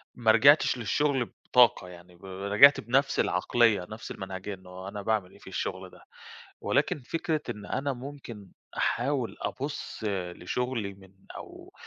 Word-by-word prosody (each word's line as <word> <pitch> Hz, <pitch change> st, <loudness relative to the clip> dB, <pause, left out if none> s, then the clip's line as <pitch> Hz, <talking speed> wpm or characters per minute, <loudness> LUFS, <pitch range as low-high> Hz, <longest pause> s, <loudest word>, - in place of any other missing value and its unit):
ما 115 Hz, -2 st, +4 dB
رجِعتش 135 Hz, +6 st, +5 dB
للشغل 135 Hz, +2 st, 0 dB
بطاقة، 120 Hz, -7 st, +4 dB
يعني 90 Hz, 0 st, -14 dB
ب 85 Hz, -, -16 dB
رجِعت 100 Hz, +9 st, +5 dB
بنَفس 135 Hz, +5 st, +1 dB
العقلية، 115 Hz, -7 st, +2 dB
نفس 110 Hz, +1 st, -8 dB
المنهجية، 95 Hz, +1 st, -6 dB
إنه 95 Hz, 0 st, -10 dB
أنا 100 Hz, +1 st, -6 dB
باعمل 105 Hz, -3 st, -1 dB
إيه -, -, -18 dB
في -, -, -17 dB
الشغل -, -, -4 dB
ده، -, -, -18 dB, 0.6 s
ولكن 145 Hz, -, 0 dB
فكرة 155 Hz, +3 st, -2 dB
إن 105 Hz, 0 st, -6 dB
أنا 140 Hz, +5 st, -2 dB
ممكن 125 Hz, -6 st, -10 dB, 0.3 s
أحاول 135 Hz, -5 st, 0 dB
أبُص 145 Hz, +3 st, -5 dB
لشُغلي 100 Hz, +4 st, -3 dB
من 95 Hz, -1 st, -18 dB, 0.2 s
أو -, -, -12 dB
110 Hz, 140 wpm, -28 LUFS, 95-130 Hz, 0.6 s, رجِعتش